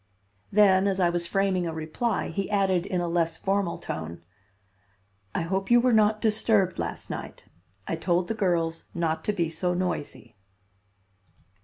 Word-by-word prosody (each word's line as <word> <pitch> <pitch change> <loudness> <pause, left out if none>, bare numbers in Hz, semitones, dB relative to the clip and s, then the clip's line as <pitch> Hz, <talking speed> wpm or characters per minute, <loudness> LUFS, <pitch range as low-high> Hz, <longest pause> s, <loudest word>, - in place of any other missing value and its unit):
Then, 195 -2 +5
as 195 -1 0
I 175 -2 +3
was 170 0 -2
framing 190 -2 +1
a 165 - -3
reply, 160 +9 -2
he 195 -1 -3
added 195 -3 +1
in 180 -2 -1
a 175 - -1
less 165 -1 0
formal 195 -2 0
tone: 85 +1 -6 1.1
"I - - +1
hope 190 +3 -2
you 240 0 +7
were 250 0 +3
not 215 0 +3
disturbed 215 -4 +2
last - - -4
night. - - -7 0.4
I 165 - -2
told 175 +1 0
the - - -1
girls 170 -6 0
not 165 -2 -1
to - - +2
be 175 -5 0
so 180 +3 -1
noisy." 175 -9 -3
185 Hz, 160 wpm, -26 LUFS, 170-200 Hz, 1.1 s, you